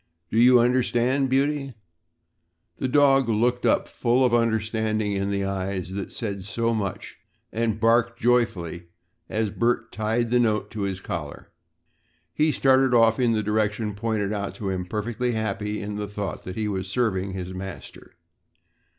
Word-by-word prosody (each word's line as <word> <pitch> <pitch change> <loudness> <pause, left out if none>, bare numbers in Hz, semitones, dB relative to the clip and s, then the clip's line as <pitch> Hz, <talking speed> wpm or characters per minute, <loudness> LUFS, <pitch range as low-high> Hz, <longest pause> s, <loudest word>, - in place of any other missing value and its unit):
Do 110 - +2
you 125 +1 +7
understand, 125 +2 +2
Beauty?" 135 -1 0 1.0
The 130 - 0
dog 135 -2 +4
looked 120 +3 +1
up - - +3
with - - -19
full 125 0 +2
understanding 110 -2 0
in 100 0 -1
the 100 -1 -1
eyes 95 -1 -3
that 95 0 -5
said 100 -5 -4
so 115 +3 -1
much 100 -4 -4 0.4
and 110 -1 -1
barked 115 +1 +2
joyfully 95 -8 0 0.4
as 110 -1 -1
Bert 115 0 0
tied 115 +2 -1
the 125 - +4
note 110 -3 0
to 110 - -5
his 95 0 -6
collar. 75 -6 -6 0.8
He 155 +1 +2
started 130 -2 +3
off 115 0 +4
in 120 -2 +3
the 110 -1 0
direction 105 0 0
pointed 105 -1 -2
out 100 -1 -4
to 105 -5 -4
him 90 -1 -3
perfectly 115 +4 -2
happy 105 -1 -2
in 105 0 -5
the 105 0 -3
thought 100 -1 -5
that 90 - -6
he 110 -1 -2
was 95 -2 -3
serving 95 -4 0
his 95 -1 -5
master. 95 -6 -9
110 Hz, 160 wpm, -24 LUFS, 100-120 Hz, 1.0 s, you